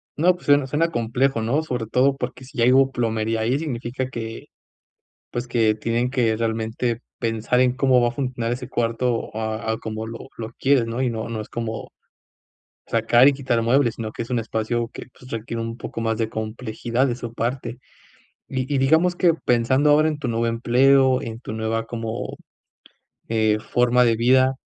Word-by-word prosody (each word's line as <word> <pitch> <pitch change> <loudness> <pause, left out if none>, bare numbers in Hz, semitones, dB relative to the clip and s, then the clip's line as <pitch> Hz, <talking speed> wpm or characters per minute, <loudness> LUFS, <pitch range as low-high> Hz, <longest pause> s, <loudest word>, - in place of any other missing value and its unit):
No, 175 +4 +4
pues 175 - -15
suena 145 -1 +5
suena 150 +5 +1
complejo, 120 -1 0
¿no? 125 +8 +1
Sobre 125 -7 -3
todo 130 +5 +2
porque 130 - -5
si 130 +2 -14
ya 115 - +4
hubo 135 0 +4
plomería 115 -2 -1
ahí, 125 +5 +1
significa 130 -3 -3
que, 115 -2 -6 0.8
pues 120 +1 -3
que 115 -2 +2
tienen 115 +3 -1
que 120 -4 +1
realmente 115 +1 -2 0.2
pensar 115 +1 0
en 125 -1 +4
cómo 130 -1 +3
va 120 - +3
a - - -2
funcionar 125 -3 -2
ese 125 0 -5
cuarto 115 -1 -1
a 110 0 -3
a 110 - -3
como 110 0 -5
lo 115 +3 -8
lo 115 0 -6
quieres, 135 -3 +3
¿no? 115 +2 -3
Y 130 - +2
no 115 -1 -4
no 110 -1 -3
es 110 - -8
como 115 -1 -5 0.9
sacar 120 +3 +5
y - - +4
quitar 130 -4 0
muebles, 120 0 +3
sino 110 -2 -5
que - - -5
es 115 - -10
un 125 - +1
espacio 115 +1 -2
que, - - -9
pues, 125 - -14
requiere 115 0 -4
un 115 0 -5
poco - - -6
más 115 -1 0
de 115 -1 0
complejidad 110 +3 -2
de 125 - -1
su 120 -1 -7
parte. 120 +1 -3 0.7
Y 130 +1 -3
y - - +2
digamos 160 +7 +3
que 175 -2 +4
pensando 130 0 +2
ahora 150 +1 +5
en 155 -2 -2
tu 135 -5 -3
nuevo 115 0 0
empleo, 130 +3 +4
en 115 +1 -6
tu - - -7
nueva, 110 +1 -2
como, 115 -1 -5 0.9
eh, 110 -1 +2
forma 125 +2 +2
de 115 -1 +3
vida, 130 +3 +4
120 Hz, 190 wpm, -23 LUFS, 115-130 Hz, 0.9 s, suena